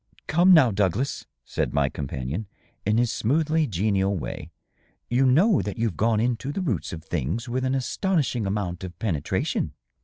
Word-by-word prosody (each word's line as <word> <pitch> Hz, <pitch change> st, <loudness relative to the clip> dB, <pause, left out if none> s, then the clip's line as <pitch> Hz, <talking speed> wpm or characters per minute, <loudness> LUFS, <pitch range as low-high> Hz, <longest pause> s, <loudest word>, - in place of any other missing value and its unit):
'' -, -, -26 dB
" -, -, -46 dB
Come, 175 Hz, +4 st, +5 dB
now, 150 Hz, -9 st, +7 dB
Douglas," 105 Hz, +6 st, -1 dB, 0.2 s
said -, -, -2 dB
my 70 Hz, -1 st, +3 dB
companion, 70 Hz, -, -4 dB, 0.4 s
in 105 Hz, +1 st, +3 dB
his 120 Hz, -1 st, +2 dB
smoothly 155 Hz, +7 st, +1 dB
genial 100 Hz, 0 st, +1 dB
way, 80 Hz, -, -6 dB, 0.6 s
"you 130 Hz, +2 st, +4 dB
know 170 Hz, -, +4 dB
that 100 Hz, +1 st, -5 dB
you've 115 Hz, -6 st, -1 dB
gone 110 Hz, +4 st, +2 dB
into 125 Hz, +4 st, -1 dB
the 170 Hz, -, -3 dB
roots 115 Hz, -, -2 dB
of 80 Hz, -2 st, -7 dB
things 85 Hz, -, -2 dB
with 125 Hz, +2 st, -2 dB
an 130 Hz, +1 st, +1 dB
astonishing 130 Hz, -, 0 dB
amount 95 Hz, -3 st, -2 dB
of 90 Hz, -3 st, -7 dB
penetration." 85 Hz, -10 st, -1 dB
110 Hz, 175 wpm, -25 LUFS, 95-130 Hz, 0.6 s, now